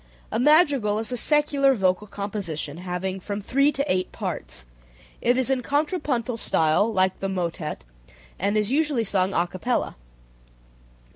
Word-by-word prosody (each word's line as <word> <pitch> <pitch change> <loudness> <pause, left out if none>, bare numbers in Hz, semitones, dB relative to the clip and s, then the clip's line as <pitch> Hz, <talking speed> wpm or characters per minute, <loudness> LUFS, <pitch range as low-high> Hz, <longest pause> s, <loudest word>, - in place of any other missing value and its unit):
A - - 0
madrigal 280 -7 +4
is 225 +2 -3
a - - -1
secular 280 0 +3
vocal 190 0 +1
composition 195 -8 -4
having 185 +1 -4
from 200 +2 -4
three 275 +8 +2
to 280 -1 -2
eight 185 -8 0
parts. - - -5 0.6
It 245 +1 +3
is 260 0 +1
in 260 -1 +1
contrapuntal 280 -4 -1
style, 165 +3 +2
like 190 -2 +1
the 195 - -2
motet, 170 - -3 0.6
and 200 +3 +1
is 210 +2 +1
usually 290 -4 +2
sung 195 -2 0
a 170 - +3
capella. 185 +8 -1
176. - - -29
210 Hz, 150 wpm, -24 LUFS, 185-270 Hz, 0.6 s, madrigal